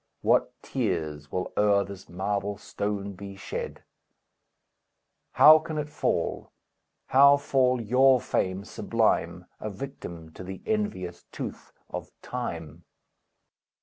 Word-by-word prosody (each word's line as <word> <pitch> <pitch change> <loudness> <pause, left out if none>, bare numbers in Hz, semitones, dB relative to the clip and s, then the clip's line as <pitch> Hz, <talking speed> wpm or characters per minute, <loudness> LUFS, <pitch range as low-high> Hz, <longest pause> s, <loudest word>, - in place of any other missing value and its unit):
What - - +3
tears 75 -2 -2
will 90 - -3
o'er 100 -1 +4
this 100 -1 -10
marble 100 +2 -2
stone 100 -1 -3
be 100 +1 -9
shed! 95 -1 -6 1.5
How 155 +1 +9
can 155 0 -5
it 150 0 -2
fall? - - -1 0.6
How 140 +2 +7
fall 130 -3 +2
your 130 +3 +5
fame 95 -6 -1
sublime, - - 0
A 110 - -4
victim 90 -8 -8
to 95 - -10
the 95 +1 -8
envious 150 - -2
tooth - - -7 0.2
of - - -6
Time? 85 - -5
100 Hz, 115 wpm, -27 LUFS, 95-130 Hz, 1.5 s, How